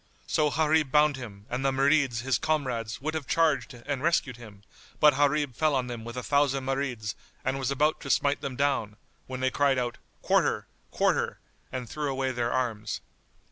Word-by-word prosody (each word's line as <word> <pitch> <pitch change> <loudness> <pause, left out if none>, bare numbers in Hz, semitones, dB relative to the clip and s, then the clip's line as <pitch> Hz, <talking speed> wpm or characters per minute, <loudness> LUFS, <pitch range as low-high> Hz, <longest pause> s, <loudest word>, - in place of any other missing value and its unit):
So 150 -1 +2
Gharib 155 0 +2
bound 150 0 +4
him, 105 -6 -9
and 125 +2 -3
the 135 - +3
Marids 135 -3 +2
his 130 -1 +1
comrades 130 -8 -1
would 155 +3 -2
have 155 -5 -4
charged 155 -4 +1
and 140 -3 -2
rescued 155 -5 +1
him, 105 -4 -13 0.4
but 150 -1 +7
Gharib 145 -1 +1
fell 155 -2 +2
on 130 -2 +1
them 120 -2 -6
with 120 +2 -7
a 125 - -3
thousand 140 -1 +2
Marids 130 -6 -2 0.3
and 130 +1 0
was 130 -1 -1
about 150 +3 +1
to - - -7
smite 140 0 +2
them 135 -2 -4
down, 130 -7 0 0.3
when 130 0 -5
they 130 0 +2
cried 140 -1 +2
out 120 -1 -2 0.2
"Quarter! - - +2 0.2
Quarter!" - - +1 0.3
and 125 -2 -4
threw 150 +3 -3
away 135 0 -1
their 120 -1 -1
arms. 115 -4 -2
135 Hz, 185 wpm, -28 LUFS, 125-145 Hz, 0.4 s, but